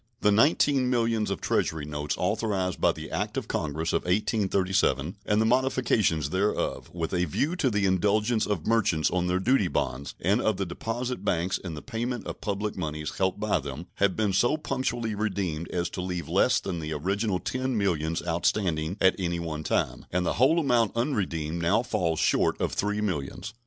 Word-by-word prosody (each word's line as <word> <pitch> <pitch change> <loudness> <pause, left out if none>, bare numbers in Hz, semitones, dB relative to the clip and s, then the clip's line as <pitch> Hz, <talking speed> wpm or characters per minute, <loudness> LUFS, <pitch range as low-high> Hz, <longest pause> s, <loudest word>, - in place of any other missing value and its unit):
The 105 - +4
nineteen 135 +3 +3
millions 115 -3 +1
of 100 - -3
Treasury 80 -2 0
notes 75 -1 -3
authorized 95 -2 -1
by - - +5
the - - -8
act - - -2
of - - -3
Congress 80 +2 -2
of - - +2
1837, 95 - +1
and 105 0 +3
the 110 - +3
modifications 115 - +2
thereof 100 +3 -1
with 85 -1 -4
a 90 0 +2
view 145 - -1
to 140 -7 +2
the 105 -3 +1
indulgence 105 +4 +2
of 95 -7 -2
merchants 105 -9 +2
on 90 -1 0
their 90 +1 +1
duty 110 -1 +3
bonds 70 -4 -2
and 100 +7 +2
of 110 -3 +1
the 100 - -1
deposit 115 +5 -4
banks 90 -2 0
in 85 -4 -6
the 75 - -8
payment 120 0 -3
of - - -6
public 105 0 -2
moneys 75 -3 -4
held 95 +1 +1
by 105 -4 +1
them, 70 +3 -6
have 100 -2 +2
been 105 -3 +1
so 120 +10 +3
punctually 125 -6 -2
redeemed 95 -6 -2
as 85 -1 -1
to 90 - -4
leave 90 -1 -4
less - - +3
than 90 -3 -4
the 80 0 -4
original 95 +6 0
ten 130 +4 -2
millions 85 -5 0
outstanding 85 0 0
at 95 - +4
any 85 -2 -1
one 80 -2 -4
time, - - -1
and 90 0 0
the - - +1
whole 155 +6 +5
amount 120 -8 +2
unredeemed 85 - -1
now 100 +8 +2
falls 85 -8 -1
short - - +2
of - - -1
three 105 +1 -1
millions. 90 0 -3
95 Hz, 190 wpm, -27 LUFS, 85-110 Hz, -, by